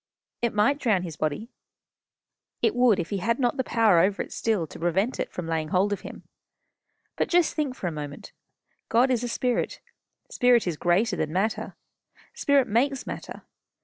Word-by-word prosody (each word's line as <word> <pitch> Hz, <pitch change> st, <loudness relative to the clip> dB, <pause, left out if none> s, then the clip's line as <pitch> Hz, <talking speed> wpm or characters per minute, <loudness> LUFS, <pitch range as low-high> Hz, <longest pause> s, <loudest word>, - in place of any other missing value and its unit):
"It 235 Hz, -2 st, -1 dB
might 230 Hz, +8 st, +3 dB
drown 215 Hz, -10 st, +1 dB
his 165 Hz, -4 st, -6 dB
body." 155 Hz, -, -3 dB, 1.1 s
"It -, -, +3 dB
would 245 Hz, -5 st, +4 dB
if 170 Hz, -, -4 dB
he 200 Hz, -, -1 dB
had 230 Hz, +5 st, 0 dB
not 250 Hz, 0 st, 0 dB
the 260 Hz, -, +1 dB
power 225 Hz, -8 st, +3 dB
over 195 Hz, +4 st, +2 dB
it -, -, -14 dB
still, 215 Hz, -7 st, 0 dB
to -, -, -12 dB
prevent 190 Hz, +9 st, 0 dB
it -, -, -2 dB
from 180 Hz, -, -5 dB
laying 160 Hz, -1 st, -2 dB
hold 190 Hz, +5 st, +1 dB
of 205 Hz, -, -5 dB
him. -, -, -10 dB, 0.9 s
But -, -, 0 dB
just 350 Hz, -2 st, +3 dB
think 290 Hz, -5 st, -2 dB
for 195 Hz, -, -7 dB
a 175 Hz, -, 0 dB
moment. 145 Hz, -2 st, -7 dB, 0.6 s
God 245 Hz, +3 st, +3 dB
is 245 Hz, -2 st, 0 dB
a -, -, -1 dB
Spirit. 245 Hz, +1 st, -1 dB, 0.5 s
Spirit 245 Hz, -2 st, +4 dB
is 175 Hz, -3 st, -1 dB
greater 175 Hz, +8 st, +1 dB
than 155 Hz, -, -2 dB
matter. 195 Hz, +6 st, -1 dB, 0.6 s
Spirit 280 Hz, -3 st, +2 dB
makes 265 Hz, +5 st, +1 dB
matter. -, -, -7 dB
215 Hz, 180 wpm, -26 LUFS, 175-245 Hz, 1.1 s, would